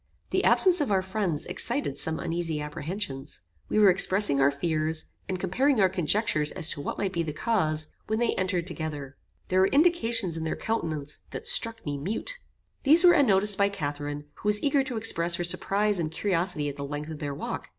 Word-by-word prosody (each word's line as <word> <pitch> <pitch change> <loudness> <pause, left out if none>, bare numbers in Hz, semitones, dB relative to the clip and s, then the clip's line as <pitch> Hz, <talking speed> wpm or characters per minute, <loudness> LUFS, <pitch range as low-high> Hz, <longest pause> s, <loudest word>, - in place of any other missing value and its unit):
The - - 0
absence 360 -3 +4
of 275 - -1
our 190 -1 +1
friends 190 -5 -2
excited 240 - -1
some 160 0 0
uneasy 165 -2 -2
apprehensions. 150 - -5 0.3
We - - -1
were 205 -3 +6
expressing 185 -5 +3
our 135 - +5
fears, 155 +2 -1 0.2
and 185 -1 -3
comparing 250 +8 +1
our 190 -2 +4
conjectures 175 -3 0
as 170 -4 +2
to 145 - -4
what - - -5
might 195 -2 -2
be 170 - -1
the 160 -2 -3
cause, 155 -6 0 0.2
when 220 - -1
they 235 0 0
entered 185 -2 -2
together. 150 -6 -6 0.3
There 185 - +2
were 190 - +4
indications 235 - +2
in 160 - -4
their 160 - -3
countenances 155 -9 -3
that 455 - -7
struck 230 - +3
me 145 -2 -4
mute. 225 - -5 0.4
These 315 +5 +7
were 350 -1 +7
unnoticed 205 -7 +4
by 200 0 +3
Catharine, 145 -5 -5
who - - -7
was 210 0 +4
eager 280 -1 +2
to 250 -4 -4
express 175 -6 +3
her 175 - -3
surprize 195 +3 0
and 160 -2 -2
curiosity 170 -4 -1
at 145 - -6
the 140 - -5
length 145 +2 -6
of 155 - -8
their 145 -2 -4
walk. - - -6
185 Hz, 200 wpm, -26 LUFS, 155-215 Hz, 0.4 s, These